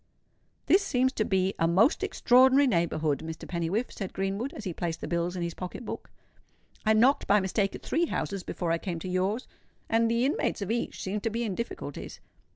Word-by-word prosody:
"This 385 - +5
seems 260 -8 +2
to 220 - 0
be 190 -1 +1
a 165 - +3
most 195 - +4
extraordinary 260 +3 +5
neighbourhood, 170 - +1
Mr. 160 0 -7
Pennywhiffe," 180 +7 -1
said 195 -3 -6
Greenwood, 195 +7 -2
as 225 - -8
he 185 -4 -3
placed 165 -1 -3
the - - -5
bills 170 +2 -1
in 175 - -2
his 170 -1 -3
pocket 185 +8 -7
book. - - -6 0.7
"I 220 - +4
knocked 245 +6 +4
by 210 - +5
mistake 195 +1 0
at - - -10
three 340 +1 +1
houses 200 -9 -2
before 175 -1 -3
I 165 - +1
came 175 -2 -4
to 165 - -6
yours, 190 +6 -1 0.4
and 225 0 +2
the 235 +2 +2
inmates 265 -6 0
of 200 - -3
each 235 - -2
seemed 200 +2 -2
to 225 - 0
be 230 +2 -2
in 215 -4 -2
difficulties." 235 +5 -6
200 Hz, 205 wpm, -28 LUFS, 175-235 Hz, 0.7 s, This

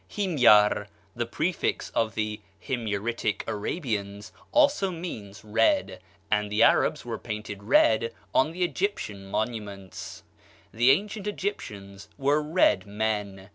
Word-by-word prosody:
Himyar, 125 - +4 0.3
the - - -2
prefix - - -1
of 110 -1 0
the 105 -1 -2 0.2
Himyaritic 115 -2 -2
Arabians, 105 - -3 0.2
also 285 -9 +4
means 110 - -7
red, 285 - +1 0.3
and 105 -1 +1
the 105 +2 +4
Arabs - - +3
were - - -4
painted 105 -2 -6
red 110 +2 +3 0.2
on 135 +4 +3
the 180 +2 -2
Egyptian 170 - -2
monuments. 105 -3 -5 0.5
The 120 +3 +4
ancient 205 +6 +1
Egyptians 100 - -5
were 145 +2 +2
red 150 - +2
men. 105 -2 -3
110 Hz, 115 wpm, -27 LUFS, 105-155 Hz, 0.5 s, Himyar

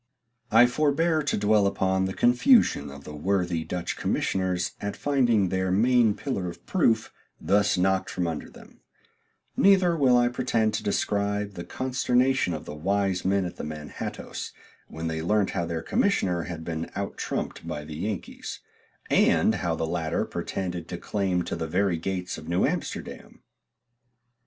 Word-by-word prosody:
I 115 +3 +7
forbear 155 +5 +2
to 145 - -1
dwell 105 -1 +3
upon 95 -1 +1
the 95 - -3
confusion 120 - +4
of 70 0 -10
the 75 - -8
worthy 90 0 0
Dutch 90 +1 -3
commissioners 90 -2 -1
at 100 0 -4
finding 120 -9 +2
their 95 0 0
main 115 +2 +4
pillar 100 -11 -3
of 85 - -12
proof 115 - +1 0.3
thus 100 0 +2
knocked 95 +1 +1
from 90 - -2
under 80 -2 -4
them; - - -16 0.8
neither 190 -3 +5
will 130 -5 +4
I 120 0 +4
pretend 115 -3 0
to 105 - -2
describe 100 0 -1
the 85 - -6
consternation 130 -5 +1
of 75 - -7
the - - -7
wise 95 +3 0
men 95 0 +1
at 90 - -6
the - - -6
Manhattoes 75 -1 -6 0.3
when 80 +1 -7
they 80 -1 -2
learnt 100 +4 +1
how 85 -3 -2
their 80 -1 -3
commissioner, 90 - +1
had 85 -2 -6
been 80 0 -4
out 100 0 -3
trumped - - -4
by 75 0 -5
the 75 -1 -7
Yankees, 100 +3 -5 0.5
and - - +4
how 85 -2 0
the 80 - -2
latter 80 -1 -1
pretended 90 -3 -4
to 85 - -5
claim 95 -2 -1
to - - -4
the 80 - -3
very 90 +1 +1
gates 90 0 -3
of 80 +1 -10
New 85 +1 +2
Amsterdam. - - -5
95 Hz, 160 wpm, -26 LUFS, 85-115 Hz, 0.8 s, I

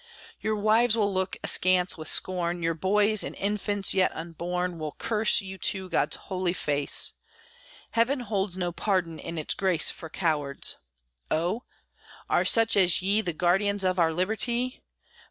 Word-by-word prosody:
Your 215 0 -1
wives 220 +2 +2
will 205 -2 +1
look 190 0 -2
askance 185 0 +3
with 155 - -9
scorn; 175 -1 0
Your 165 0 +1
boys, 205 +5 +2
and - - -6
infants 205 0 0
yet 190 -1 +3
unborn, 175 +2 -4
Will 155 -1 -5
curse 220 -1 +2
you 190 -1 -9
to 190 -2 0
God's - - +1
holy 185 -2 -3
face! 145 -5 0 0.8
Heaven 250 +4 +1
holds 200 -5 -3
no 175 -1 -2
pardon 175 -3 -2
in 170 - -7
its 155 - -3
grace 185 -5 +4
For 160 - -10
cowards. 150 -5 -1 0.5
Oh! 180 +10 -1 0.7
are - - +2
such 225 -1 +4
as 185 -2 +3
ye 200 +3 +2
The 175 -5 -4
guardians 195 +4 +1
of 185 0 0
our 165 -1 +3
liberty? 220 +8 -1
185 Hz, 155 wpm, -26 LUFS, 170-210 Hz, 0.8 s, grace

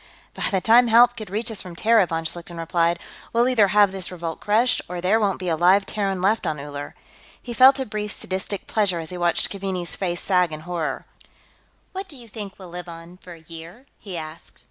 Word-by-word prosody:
"By - - -3
the 190 -2 0
time 235 +5 +6
help 240 +1 +6
could 215 -4 -8
reach 220 +4 -2
us 215 - -5
from 180 -2 -9
Terra," 220 0 +4
von 165 -1 -3
Schlichten 170 +1 -5
replied, 170 +1 +1 0.3
"we'll 235 +1 +3
either 230 -6 +4
have 205 0 +4
this 190 -2 -4
revolt 170 -2 -5
crushed, 225 +4 +2
or 180 0 -4
there 190 +5 +2
won't 200 -3 +1
be 185 - -6
a 165 - +1
live 185 +4 +4
Terran 195 -3 -2
left 215 +4 +2
on 150 - -2
Uller." 145 0 -7 0.4
He 240 - -7
felt 265 +3 +7
a 265 - -1
brief 210 -1 -4
sadistic 190 +1 -4
pleasure 200 -5 +1
as 160 0 -6
he 180 - -5
watched 175 -1 +1
Keaveney's 190 -3 -3
face 175 -3 -2
sag 180 -3 +2
in 155 0 -6
horror. 170 -1 -3 0.9
"What 385 +1 -5
do 300 -7 -8
you 240 -2 -13
think 205 -3 -8
we'll 185 -2 -11
live 175 0 -7
on, 165 +1 -11
for 180 -1 -12
a 165 - -14
year?" 165 - -11
he 190 -4 -7
asked. 155 0 -9
185 Hz, 220 wpm, -23 LUFS, 170-215 Hz, 0.9 s, felt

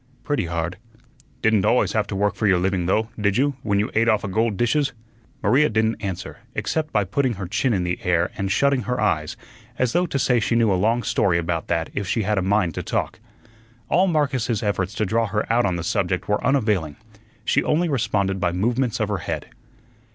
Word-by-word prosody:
"Pretty 145 - -1
hard." 85 +1 -3 0.7
"Didunt 110 -3 +3
always 125 - +3
have 110 -2 0
to 100 - -4
work 100 +1 +1
for 110 - -1
your 95 -2 +4
living, 90 -1 0
though, 110 +4 +1
did 100 -1 +1
you, 140 +2 +2
when 100 -2 0
you 105 +2 0
ate 115 +1 +3
offa 110 -2 +1
gold 110 +1 0
dishes?" 140 +6 +1 0.5
Maria 130 +8 +4
didn't 110 0 0
answer, 95 -2 -5 0.2
except 155 -1 -2
by 105 - +2
putting 125 +6 0
her 100 -2 -5
chin 120 +8 0
in 95 -5 +1
the 90 0 -2
air 90 0 +1
and 100 0 -2
shutting 140 +4 +2
her 125 -2 -1
eyes, 75 -8 0 0.4
as 125 -2 0
though 180 +1 +2
to 140 - -2
say 125 -2 +2
she 115 +1 0
knew 115 -3 +3
a - - +3
long 110 +6 +1
story 95 -4 +2
about 85 -1 -2
that 80 -1 -1
if 100 -2 -3
she 110 +3 0
had 105 0 +1
a - - 0
mind 95 -3 +1
to - - -4
talk. - - -2 0.7
All 185 +4 +3
Marcus's 135 - 0
efforts 100 -1 -1
to 110 - 0
draw 115 +3 +1
her 105 +2 -1
out 120 +1 +3
on 90 - -1
the 85 - -4
subject - - -1
were 105 0 0
unavailing. 105 - +1 0.5
She - - +2
only 170 +3 +1
responded 105 -8 0
by 90 -2 0
movements 120 +6 0
of 110 - +1
her 100 -2 -1
head. - - -5
105 Hz, 215 wpm, -23 LUFS, 95-120 Hz, 0.7 s, your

